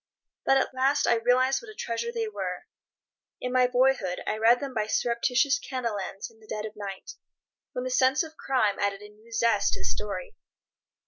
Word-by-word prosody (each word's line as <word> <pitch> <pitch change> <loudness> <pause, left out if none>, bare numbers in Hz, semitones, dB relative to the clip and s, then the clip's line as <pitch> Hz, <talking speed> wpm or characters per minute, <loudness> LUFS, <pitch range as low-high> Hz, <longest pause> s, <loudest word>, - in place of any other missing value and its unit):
But 270 - +6
at 265 - 0
last 270 +3 +2
I - - +4
realized 255 +3 +3
what - - -12
a 430 - -11
treasure 235 - -3
they 460 -1 -2
were. 430 - -4 0.7
In 250 0 -3
my 255 -1 +5
boyhood 250 -8 +2
I 215 - 0
read 235 +2 +5
them 275 -2 -5
by 215 -3 -1
surreptitious 245 +5 +2
candle 235 -6 -3
ends 195 +1 -5
in 225 - -23
the 215 - -18
dead 215 0 -4
of 215 - -6
the 210 - -16
night, 195 -2 -6 0.6
when 250 - -3
the 255 - -3
sense 260 +4 +3
of 315 -1 -10
crime 235 -10 +1
added 200 0 0
a 210 - -11
new 215 +2 -20
zest 230 -2 +2
to - - -2
the - - -3
story. 325 - -3
245 Hz, 205 wpm, -27 LUFS, 215-265 Hz, 0.7 s, But